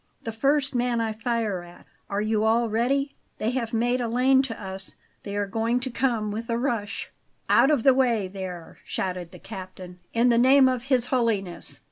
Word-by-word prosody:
"The 225 - -3
first 275 +5 +1
man 245 -1 +1
I 225 -1 -1
fire 220 -4 -1
at. 175 0 -14 0.2
Are 200 +1 -1
you 215 0 +1
all 225 +1 +2
ready? 275 +6 0 0.2
They 220 - -1
have 240 -3 -2
made 245 +2 +1
a 240 - -1
lane 255 +3 +4
to 255 -4 -5
us; 190 -1 -7 0.3
they 200 -1 -6
are 205 0 0
going 225 +4 0
to 260 0 -3
come 230 -4 0
with 225 +3 -5
a 230 - +1
rush." 230 -5 -2 0.4
"Out 270 - +6
of 290 -7 +2
the 270 - +7
way 240 -6 +2
there!" 185 -3 -8
shouted 180 -2 -3
the - - -12
captain. 185 -1 -9
"In 235 +2 +3
the 235 -1 +4
name 260 +2 +6
of 255 -1 -1
His 260 -3 +2
Holiness!" 215 -8 -1
230 Hz, 195 wpm, -25 LUFS, 205-250 Hz, 0.4 s, the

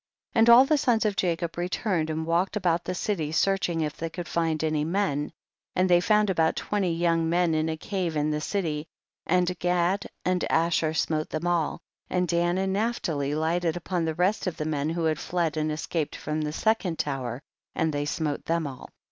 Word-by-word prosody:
48. - - +1
And 225 +1 +6
all 240 +3 +9
the 300 +1 +2
sons 235 -5 +2
of 210 -2 +1
Jacob 170 -2 -1
re 175 +1 -1
turned 175 -6 -1
and 160 0 -2
walked 170 +5 +1
about 175 -3 +1
the 185 - -3
city, 170 -6 -2
searching 175 -1 +1
if 150 -2 -2
they 165 - -3
could 175 +1 -6
find 160 -2 0
any 155 -1 +1
men, 160 -4 -1 0.4
and 185 +1 +3
they 175 -1 +5
found 210 +1 +3
about 160 -3 +2
twenty 200 -4 -1
young 165 -1 +1
men 175 -1 +2
in 155 +1 +1
a 160 - -2
cave 180 -2 -3
in 150 +1 +1
the 150 0 -1
city, 160 -4 -2 0.4
and 180 0 +1
Gad 180 +2 +1 0.2
and 185 -1 +1
Asher 165 -1 +2
smote 155 -1 0
them 155 +2 -3
all, 175 -3 0 0.3
and 180 -1 +1
Dan 175 +1 +1
and 190 0 0
Naphtali 170 -10 -1
lighted 165 +2 0
upon 175 0 -2
the 160 -1 -2
rest 185 +4 +1
of 180 - -3
the 155 - -3
men 150 -1 -1
who 165 +1 -2
had 155 -1 +1
fled 170 -3 -1
and 155 0 0
escaped 155 0 -2
from 155 +1 -3
the 150 0 -2
second 190 -2 0
tower, 130 -3 -3 0.3
and 160 -1 0
thev 145 0 -1
smote 150 -2 -2
them 165 -1 0
all. 135 -3 -8
170 Hz, 205 wpm, -26 LUFS, 155-185 Hz, 0.4 s, all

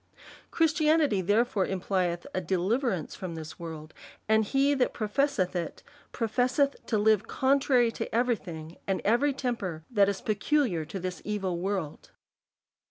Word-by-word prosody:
Christianity, 310 - +3
therefore, 205 +1 +2
implieth 180 -2 -1
adeliverance 185 - 0
from 180 -3 -6
this 160 0 -8
world; 160 -2 -8 0.3
and 220 0 +4
he 275 +6 +2
that 260 -3 0
professeth 215 -4 0
it, 170 -2 -4 0.3
professeth 255 +4 +1
to 220 - +1
live 215 -1 +3
contrary 265 -3 +3
to 225 -1 -5
every 240 0 +3
thing 160 -5 -9
and 195 -1 0
every 240 +7 +3
temper 215 - -3
that 200 -4 +4
is 200 -1 -2
peculiar 215 - 0
to 195 - -6
this 185 0 -5
evil 195 -4 -2
world. 185 -5 -3
210 Hz, 135 wpm, -28 LUFS, 180-250 Hz, 0.3 s, and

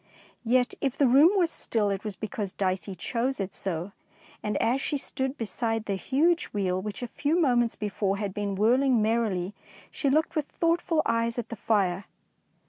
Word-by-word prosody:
Yet, 250 +1 +3
if 275 -1 -1
the 285 - +4
room 275 +6 +7
was 350 -4 +2
still, 210 -3 0
it 195 0 -3
was 210 -3 -5
but - - -38
because 210 -2 -4
Dicey 190 0 -2
chose 240 +8 -2
it 195 -1 -3
so, 180 0 -3 0.5
and 210 -1 -1
as 255 +4 +1
she 290 - -1
stood 265 0 -2
beside 225 +1 -1
the 200 - -1
huge 300 - +2
wheel 185 -3 -1
which 210 +3 -5
a - - -2
few 295 +8 0
moments 240 -7 +2
before 200 -1 -1
had 200 -2 -3
been 205 -1 -2
whirling 245 +5 +3
merrily, 210 -4 0 0.4
she 280 - 0
looked 310 +4 +1
with 300 -2 -1
thoughtful 335 -1 +1
eyes 230 +1 0
at 240 - -4
the 230 - -5
fire. 195 -4 0
225 Hz, 185 wpm, -27 LUFS, 200-265 Hz, 0.5 s, room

